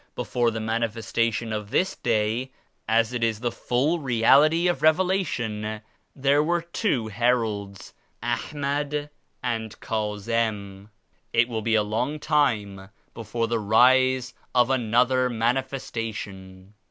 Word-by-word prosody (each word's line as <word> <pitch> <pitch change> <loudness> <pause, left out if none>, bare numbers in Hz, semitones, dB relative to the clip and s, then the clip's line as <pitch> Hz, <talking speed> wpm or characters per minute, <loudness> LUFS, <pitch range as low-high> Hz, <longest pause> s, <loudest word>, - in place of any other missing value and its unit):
Before 120 -1 0
the 110 0 -4
Manifes 115 0 -2
tation 115 -1 0
of 105 -1 -4
this 190 - +1
Day, 115 +2 0 0.4
as 115 +2 +2
it 120 -1 -2
is 110 -2 0
the 120 0 -1
full 140 +11 0
Reality 145 +6 +4
of 175 - 0
Reve 155 0 +6
lation, 120 - -2 0.3
there 140 +2 +3
were 170 +2 0
two 170 - -1
Heralds, 110 -3 -1 0.3
Ahmad 145 +4 -2 0.3
and 115 -3 -3
Ka 105 -2 -2
zim. 105 -2 -2 0.4
It 115 +1 +4
will 115 -3 -3
be 115 +1 +1
a 105 - +3
long 125 +8 -2
time 105 -11 0 0.2
before 115 +1 -3
the 115 0 0
rise 130 +4 +4 0.2
of 125 +1 +4
another 125 +1 +2
Manifestation. 115 -6 -4
115 Hz, 130 wpm, -25 LUFS, 110-130 Hz, 0.4 s, Reve